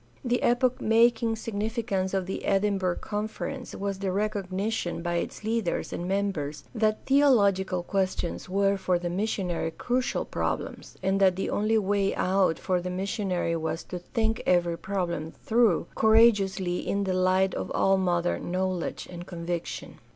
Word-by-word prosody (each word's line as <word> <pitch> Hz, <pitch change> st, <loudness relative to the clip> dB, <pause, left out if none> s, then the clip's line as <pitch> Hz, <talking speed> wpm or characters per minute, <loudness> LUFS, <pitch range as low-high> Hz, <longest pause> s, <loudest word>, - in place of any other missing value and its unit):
The 245 Hz, 0 st, +1 dB
epoch 245 Hz, +1 st, +2 dB
making 225 Hz, 0 st, +3 dB
signifi 220 Hz, +1 st, -3 dB
cance 190 Hz, -3 st, -1 dB
of 190 Hz, -1 st, 0 dB
the 190 Hz, -, -4 dB
Edinburgh 195 Hz, -2 st, +1 dB
Conference 220 Hz, +5 st, -4 dB
was 200 Hz, -1 st, -3 dB
the 195 Hz, -1 st, -1 dB
recognition 200 Hz, -2 st, -2 dB
by 175 Hz, 0 st, 0 dB
its 170 Hz, -, -4 dB
leaders 220 Hz, -4 st, -1 dB
and 175 Hz, -, -4 dB
members 185 Hz, -7 st, -2 dB
that 215 Hz, -2 st, 0 dB
theological 200 Hz, -10 st, +3 dB
questions 185 Hz, -2 st, -2 dB
were 195 Hz, +1 st, +2 dB
for 185 Hz, -2 st, +1 dB
the 175 Hz, 0 st, -3 dB
missionary 180 Hz, -4 st, -1 dB
crucial 250 Hz, +9 st, -1 dB
problems, -, -, -4 dB
and 195 Hz, +1 st, +2 dB
that 190 Hz, -2 st, +4 dB
the 195 Hz, -, -2 dB
only 215 Hz, +2 st, +2 dB
way 200 Hz, -1 st, +1 dB
out 185 Hz, -3 st, +2 dB
for 180 Hz, 0 st, 0 dB
the 180 Hz, -, -4 dB
missionary 185 Hz, -2 st, -1 dB
was 160 Hz, 0 st, -3 dB
to 180 Hz, -, -6 dB
think 225 Hz, +5 st, -1 dB
every 175 Hz, -2 st, +3 dB
problem 170 Hz, -4 st, -3 dB
through 225 Hz, -7 st, +3 dB
cour 220 Hz, 0 st, +4 dB
ageously 195 Hz, -5 st, +4 dB
in 200 Hz, 0 st, -1 dB
the 190 Hz, -1 st, 0 dB
light 185 Hz, +1 st, +2 dB
of -, -, -4 dB
all 195 Hz, 0 st, +3 dB
modern 175 Hz, -2 st, 0 dB
knowledge 185 Hz, -1 st, -2 dB
and 175 Hz, 0 st, -9 dB
conviction. 170 Hz, -1 st, -5 dB
195 Hz, 155 wpm, -27 LUFS, 180-215 Hz, -, that